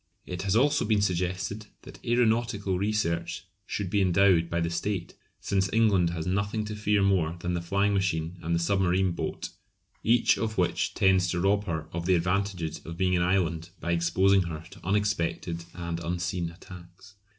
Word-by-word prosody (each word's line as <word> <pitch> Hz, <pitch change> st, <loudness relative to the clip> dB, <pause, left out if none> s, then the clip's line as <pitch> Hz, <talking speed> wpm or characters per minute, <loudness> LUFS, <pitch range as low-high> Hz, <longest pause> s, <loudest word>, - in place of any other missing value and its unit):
It 90 Hz, -1 st, -5 dB
has 100 Hz, +1 st, 0 dB
also 145 Hz, +4 st, +3 dB
been 105 Hz, -2 st, +2 dB
suggested 95 Hz, +3 st, -2 dB, 0.2 s
that -, -, -13 dB
aeronautical 115 Hz, -5 st, +1 dB
research 85 Hz, -5 st, -1 dB, 0.2 s
should 100 Hz, -4 st, -3 dB
be 100 Hz, -, +2 dB
endowed 90 Hz, -2 st, +4 dB
by 85 Hz, -, -1 dB
the 85 Hz, 0 st, -1 dB
state, 90 Hz, +1 st, -3 dB, 0.3 s
since 95 Hz, -1 st, 0 dB
England 105 Hz, -6 st, +3 dB
has 85 Hz, -2 st, -4 dB
nothing 100 Hz, +3 st, -1 dB
to 105 Hz, 0 st, -5 dB
fear 105 Hz, -1 st, +1 dB
more 90 Hz, -5 st, +2 dB
than 90 Hz, 0 st, -2 dB
the 85 Hz, -, -1 dB
flying 100 Hz, +4 st, +1 dB
machine 90 Hz, -3 st, -1 dB
and 85 Hz, 0 st, -1 dB
the -, -, +1 dB
submarine 95 Hz, +1 st, +2 dB
boat, 85 Hz, -, -4 dB, 0.5 s
each 115 Hz, +1 st, +3 dB
of 110 Hz, -1 st, -2 dB
which 90 Hz, -2 st, 0 dB
tends 95 Hz, -1 st, +3 dB
to 90 Hz, -, -1 dB
rob 100 Hz, +3 st, +2 dB
her 80 Hz, -5 st, -3 dB
of 85 Hz, 0 st, -3 dB
the 95 Hz, -, +5 dB
advantages 90 Hz, -2 st, -1 dB
of 85 Hz, +1 st, -8 dB
being 90 Hz, 0 st, +2 dB
an 90 Hz, -, +1 dB
island 85 Hz, -2 st, 0 dB
by 85 Hz, -, -2 dB
exposing 95 Hz, +3 st, +3 dB
her 80 Hz, -3 st, -5 dB
to 100 Hz, -2 st, -14 dB
unexpected 85 Hz, -4 st, -1 dB
and 85 Hz, -1 st, -4 dB
unseen 85 Hz, 0 st, -2 dB
attacks. 90 Hz, +2 st, -13 dB
90 Hz, 175 wpm, -27 LUFS, 85-100 Hz, 0.5 s, the